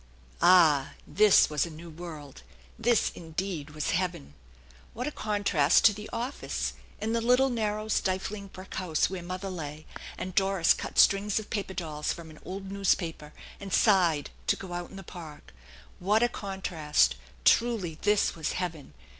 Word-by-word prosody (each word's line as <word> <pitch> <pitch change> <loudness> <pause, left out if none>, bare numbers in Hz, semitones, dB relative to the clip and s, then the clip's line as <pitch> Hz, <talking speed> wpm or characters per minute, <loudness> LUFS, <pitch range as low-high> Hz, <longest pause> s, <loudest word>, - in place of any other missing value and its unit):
Ah! 165 -6 +5
This 210 0 +5
was 150 -2 0
a 170 - -4
new 165 +1 -10
world! 155 -4 -9 0.4
This 235 0 +2
indeed 165 -2 -5
was 150 - -1
heaven! 170 - -2 0.6
What 245 +3 -3
a 300 - -2
THE - - -21
ENCHANTED - - -8
BARN 215 - -1
la 205 - +2
contrast 155 -5 +4
to 210 - +7
the 210 +1 -8
office, 245 +4 -3 0.3
and 225 +2 -1
the 230 - +1
little 250 +3 +3
narrow 215 -2 -2
stifling 200 0 -1
brick 190 0 -11
house 180 -2 0
where 190 -2 -4
mother 185 +2 -5
lay, 155 -3 -7 0.3
and 185 0 -5
Doris 195 -2 +3
cut - - -7
strings 200 +1 +4
of 220 - -4
paper 195 -3 -3
dolls 155 -4 -3
from 165 -2 -10
an 155 - -14
old 195 +1 -7
newspaper 170 -6 -1 0.3
and 200 -1 -8
sighed 175 -10 +3 0.2
to - - +3
go 185 -2 -8
out 175 0 -5
in - - -13
the 195 - -8
Park! 155 - -11 0.5
What 210 +5 +2
a 240 - +3
contrast! 165 - 0 0.3
Truly, 215 -9 +2
this 210 0 +2
was 160 -2 -3
heaven 160 - -5
185 Hz, 175 wpm, -28 LUFS, 160-205 Hz, 0.6 s, to